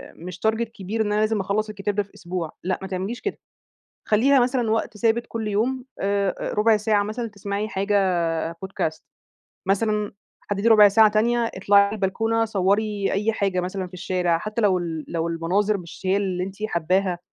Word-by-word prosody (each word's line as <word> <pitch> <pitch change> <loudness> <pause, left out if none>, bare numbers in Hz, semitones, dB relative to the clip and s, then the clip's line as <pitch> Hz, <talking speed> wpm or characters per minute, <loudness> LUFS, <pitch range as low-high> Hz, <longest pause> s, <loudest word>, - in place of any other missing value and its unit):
مش 180 +2 -9
target 225 +1 0
كبير 205 +3 -3
إن 210 -1 0
أنا 210 - +2
لازم 215 0 +1
أخلّص 200 +3 -1
الكتاب 205 -1 -3
ده 205 - +1
في 200 - -23
أسبوع، 175 -3 -4
لأ 185 +1 -1
ما 190 - -5
تعمليش 190 +6 -4
كده، 405 - -3 0.7
خلّيها 260 +6 +4
مثلًا 245 -2 +1
وقت 220 -1 -1
ثابت 230 +3 +1
كلّ 225 -2 -4
يوم 245 +5 -1 0.2
آآ 200 -1 -1
ربع 215 +1 +4
ساعة 210 -1 +2
مثلًا 215 +3 -4
تسمعي 205 0 -4
حاجة 200 0 -1 0.6
Podcast، 165 -3 -4 0.7
مثلًا 210 +1 0 0.4
حدّدي 205 +3 +1
ربع 210 -2 +8
ساعة 215 +2 +6
تانية 230 +2 +1
اطلعي 200 +1 +4
البلكونة 225 +3 0
صوّري 205 0 0
أي 210 +3 +1
حاجة 195 -4 0
مثلًا 185 +1 -3
في 180 - -15
الشارع، 180 -2 0
حتّى 215 +5 -3
لو 190 -3 +3
ال 165 -3 -4
لو 165 0 -2
المناظر 190 +5 0
مش 170 -3 -11
هي 190 - +3
اللي 185 -3 -1
أنتِ 190 0 -7
حاباها، 180 0 0
205 Hz, 175 wpm, -23 LUFS, 185-220 Hz, 0.7 s, ربع